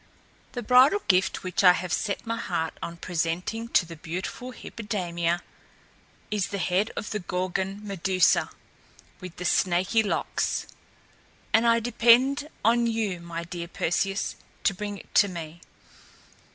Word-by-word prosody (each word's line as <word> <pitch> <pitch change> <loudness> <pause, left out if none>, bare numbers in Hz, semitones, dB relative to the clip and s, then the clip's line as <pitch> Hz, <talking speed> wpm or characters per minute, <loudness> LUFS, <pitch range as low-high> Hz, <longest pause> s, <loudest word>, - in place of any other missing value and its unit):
"The 245 - -4
bridal 255 - +5
gift 185 -1 +2
which 185 +1 -1
I 180 -1 +9
have 180 -1 -3
set 205 +1 -2
my 230 0 -2
heart 165 -7 -2
on 170 0 -5
presenting 175 +7 -2
to 185 - +3
the 165 0 -9
beautiful 180 +10 -5
Hippodamia 175 -8 -3 0.9
is 210 -3 0
the 200 - -4
head 190 +3 +1
of - - -5
the 210 - -1
Gorgon 190 +2 -3
Medusa 190 -1 +2 0.7
with 180 -2 -9
the 180 - -6
snaky 185 +5 +2
locks; 210 - -1 0.9
and 225 +1 +5
I 230 0 +5
depend 245 +5 +4 0.2
on 235 +1 +4
you, 220 -6 -1
my 170 0 -5
dear 170 0 -6
Perseus, 195 +4 -1 0.3
to - - +3
bring 205 +1 -5
it - - -15
to 205 - +6
me. 170 -2 -7
190 Hz, 140 wpm, -26 LUFS, 175-225 Hz, 0.9 s, I